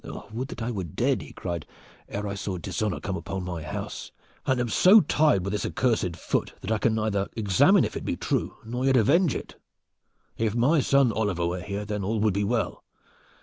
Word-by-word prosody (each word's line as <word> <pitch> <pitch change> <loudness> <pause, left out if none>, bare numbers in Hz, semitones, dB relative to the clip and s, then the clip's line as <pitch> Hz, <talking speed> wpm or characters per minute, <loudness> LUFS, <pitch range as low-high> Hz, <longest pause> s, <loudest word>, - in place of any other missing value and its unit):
"Would 125 +4 -3
that 115 - -6
I 120 - -2
were 100 -5 -3
dead," 80 - 0
he - - -10
cried, 85 -3 -5 0.4
"ere 105 +1 -3
I 100 - -3
saw 100 -2 -4
dishonor 95 +4 -2
come 95 - -3
upon 95 -1 -4
my 90 -2 -4
house, 75 - -6 0.4
and 130 -1 +2
am 120 -1 0
so 195 - +7
tied 145 - +2
with 100 - -2
this 105 - -1
accursed 110 -9 0
foot - - -2
that - - -4
I 110 - +1
can 110 +1 +2
neither 105 -3 0
examine 100 -5 +4
if - - -5
it - - -4
be - - -1
true, - - -1
nor 125 +3 -3
yet 135 -1 +4
avenge 150 - +3
it! - - -7 0.8
If 110 -1 0
my 135 +7 +4
son 135 -2 +4
Oliver 105 -6 0
were 90 +1 -2
here, 100 +2 -4
then 105 -1 -3
all 110 +3 -1
would 105 -2 +3
be 100 +2 0
well. 115 +3 -1
105 Hz, 210 wpm, -26 LUFS, 95-120 Hz, 0.8 s, so